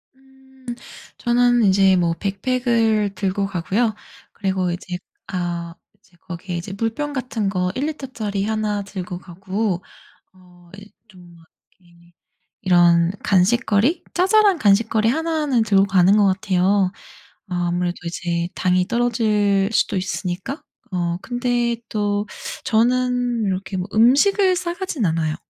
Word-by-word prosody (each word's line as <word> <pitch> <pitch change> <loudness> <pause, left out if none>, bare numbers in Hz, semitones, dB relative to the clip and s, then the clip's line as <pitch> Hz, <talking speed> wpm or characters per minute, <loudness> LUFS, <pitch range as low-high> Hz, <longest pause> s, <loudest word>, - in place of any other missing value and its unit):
음 265 0 -24 0.5
저는 245 0 +3
이제 195 -1 +4
뭐 170 -2 +1
백팩을 220 +2 0
들고 195 +1 -1
가고요. 200 +5 -1 0.4
그리고 190 -3 -1
이제 180 0 -5 0.3
아 175 -2 -4 0.2
이제 180 - -28
거기에 180 0 -6
이제 190 +4 -6
물병 235 +7 -2
같은 245 -6 -2
거 180 -2 -1
1 270 - -1
리터짜리 225 -9 -4
1나 215 -1 -1
들고 185 -3 -6
가고 190 +1 -3 0.5
어 180 -2 -21
이제 205 +1 -13 0.2
좀 180 -3 -16 0.4
이렇게 170 -1 -24 0.5
이런 175 -1 +4
간식거리 215 - +2
자잘한 390 +1 +4
간식거리 220 0 +3
1 320 +3 0
는 250 -5 +2
들고 195 -2 +3
가는 190 +1 +4
것 205 -1 +4
같아요. 190 0 +2 0.6
어 - - -4
아무래도 175 0 -1
이제 170 0 -2
당이 180 0 +1
떨어질 215 -5 +1
수도 220 - +1
있으니까 185 - -4 0.3
어 175 -2 -1
근데 245 -1 -1
또 205 -1 -1 0.4
저는 245 0 +1
이렇게 195 0 -3
뭐 180 +2 -3
음식을 365 - +4
싸가진 345 - -3
않아요. 160 -2 0
200 Hz, 250 characters per minute, -21 LUFS, 180-240 Hz, 0.6 s, 이제